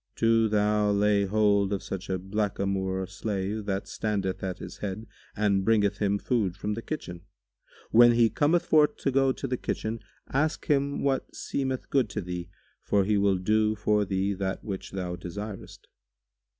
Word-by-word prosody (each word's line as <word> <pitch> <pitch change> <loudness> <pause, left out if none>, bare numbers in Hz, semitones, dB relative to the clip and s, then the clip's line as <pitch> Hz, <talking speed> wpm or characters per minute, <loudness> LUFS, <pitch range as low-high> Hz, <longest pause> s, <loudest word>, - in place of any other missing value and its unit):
Do 115 0 +3
thou 105 0 +2
lay 100 0 +3
hold 100 -1 +2
of 100 -1 -2
such 95 0 -6
a 95 - 0
blackamoor 95 -1 -1
slave 100 +2 -3
who 95 -1 0
standeth 100 -4 -2
at 95 -2 -3
his - - -9
head 105 +2 -4 0.3
and 100 -2 +2
bringeth 105 -1 +2
him 100 -1 +1
food 100 -5 -1
from 105 +2 -2
the 115 - -4
kitchen. 90 - -6 0.7
When 120 +1 +7
he 115 -1 +5
cometh 160 +7 +2
forth 150 -2 +4
to 135 - -1
go 135 0 +3
to 135 - -5
the 125 -1 -1
kitchen, 110 0 -3 0.3
ask 155 +4 0
him 140 -1 +1
what 135 -1 -1
seemeth 130 -2 -3
good 130 -6 +2
to 105 - -3
thee; 90 -1 -5 0.3
for 100 -1 +2
he 105 +1 +2
will 100 -1 +3
do 110 +3 +2
for 105 0 +2
thee 95 0 0
that 95 0 -3
which 95 -3 -5
thou 90 -2 -4
desirest." 100 +4 -8
105 Hz, 170 wpm, -27 LUFS, 95-115 Hz, 0.7 s, When